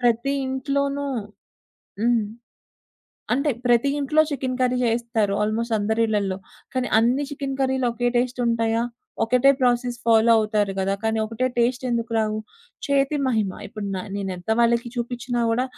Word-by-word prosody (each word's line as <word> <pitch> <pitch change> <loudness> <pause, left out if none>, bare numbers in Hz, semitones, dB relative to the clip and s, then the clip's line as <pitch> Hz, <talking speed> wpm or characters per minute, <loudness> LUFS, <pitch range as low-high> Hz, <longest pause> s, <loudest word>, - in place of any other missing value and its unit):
ప్రతి 240 +2 +2
ఇంట్లోనూ 280 +2 -1 1.0
హ్మ్. 235 -2 +3 1.1
అంటే 280 +4 +2 0.2
ప్రతి 240 +2 +4
ఇంట్లో 290 +2 +2
చికెన్ 260 -2 -2
కర్రీ 255 0 +2
జేస్తారు. 230 -3 0
ఆల్మోస్ట్ 225 +2 0
అందరి 220 +2 0
ఇళ్లల్లో. 200 -3 -1 0.3
కానీ 255 -2 -1
అన్ని 245 +5 +2
చికెన్ 275 -1 -4
కర్రీలు 265 -1 +1
ఒకే 245 +1 0
టేస్ట్ 250 +1 0
ఉంటాయా? 230 0 +1 0.4
ఒకటే 250 +4 +4
ప్రాసెస్ 245 -1 +1
ఫాలో 230 0 +5
అవుతారు 210 -2 +1
గదా! 195 +1 +1
కానీ 220 0 +1
ఒకటే 225 +3 -1
టేస్ట్ 245 +2 +1
ఎందుకు 230 -1 -1
రావు? 215 -1 0 0.5
చేతి 280 0 +2
మహిమ 220 -6 +1 0.2
ఇప్పుడు 210 0 -6
న - - -2 0.2
నేనెంత 190 -1 -5
వాళ్ళకి 235 0 +2
చూపిచ్చినా 245 0 -3
గూడా, 240 +3 +1
235 Hz, 140 wpm, -23 LUFS, 220-255 Hz, 1.1 s, ఫాలో